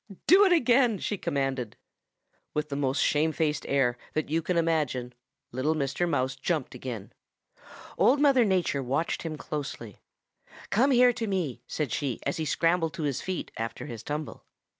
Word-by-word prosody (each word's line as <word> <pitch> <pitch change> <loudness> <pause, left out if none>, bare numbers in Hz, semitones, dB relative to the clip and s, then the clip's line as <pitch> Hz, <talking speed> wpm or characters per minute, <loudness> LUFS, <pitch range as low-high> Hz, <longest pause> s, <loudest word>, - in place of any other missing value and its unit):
'Do 380 +5 +7
it 380 - +3
again,' 245 - +4
she 205 - -2
commanded. 135 - -2 0.8
"With 150 0 -1
the 140 - -3
most 140 0 +1
shamefaced 155 0 +1
air 125 -3 +2
that 155 -1 -2
you 165 +1 +2
can 175 +2 -1
imagine, 150 -7 0 0.4
little 135 +6 0
Mr. 155 +4 -1
Mouse 130 -3 0
jumped 145 +1 -2
again. 120 -5 -7 0.9
Old 275 +3 +5
Mother 275 -4 +5
Nature 185 -8 +1
watched 135 +6 -1
him 160 -2 -5
closely. 140 -9 -6 0.7
'Come 250 +7 +4
here 250 -2 +5
to 230 -1 -3
me,' 170 - -2
said 150 -6 -3
she 130 -2 -2
as 140 - -1
he 160 - -2
scrambled 165 +2 +1
to 165 - -4
his 140 -4 -1
feet 185 -1 -4
after 115 0 -4
his 115 -3 -7
tumble. 150 +5 -5
150 Hz, 160 wpm, -28 LUFS, 130-180 Hz, 0.9 s, Do